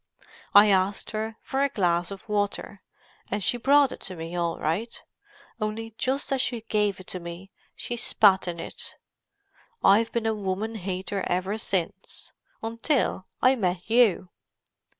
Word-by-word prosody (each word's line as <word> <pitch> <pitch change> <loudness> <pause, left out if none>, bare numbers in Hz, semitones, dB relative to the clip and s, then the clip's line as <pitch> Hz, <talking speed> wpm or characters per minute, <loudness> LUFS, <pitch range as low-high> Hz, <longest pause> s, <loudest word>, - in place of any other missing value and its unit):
I 205 +1 +9
asked 190 +1 +1
her 220 0 -3
for 270 - -1
a 280 - +3
glass 175 -6 +1
of 195 -1 -8
water, 205 -1 -2 0.5
and 205 0 -2
she 245 - +1
brought 280 +2 +4
it - - -7
to 185 - -6
me 165 +1 -6
all 170 -1 -1
right—only 215 +4 -5
just 270 +1 0
as 265 - +2
she 240 -3 -1
gave 210 -3 0
it 185 - -11
to 185 - -5
me 170 +3 -9 0.2
she 240 - -4
spat 200 -5 +4
in 170 -1 -4
it. - - -7 0.9
I've 225 +3 +5
been 235 -1 -1
a 220 - +2
woman 205 +2 -3
hater 190 -1 -3
ever 185 +3 -1
since, 185 -6 -3 0.3
until 230 -2 0 0.2
I 255 +1 +6
met 180 -6 -1
you." 220 -6 +4
205 Hz, 150 wpm, -26 LUFS, 185-225 Hz, 0.9 s, I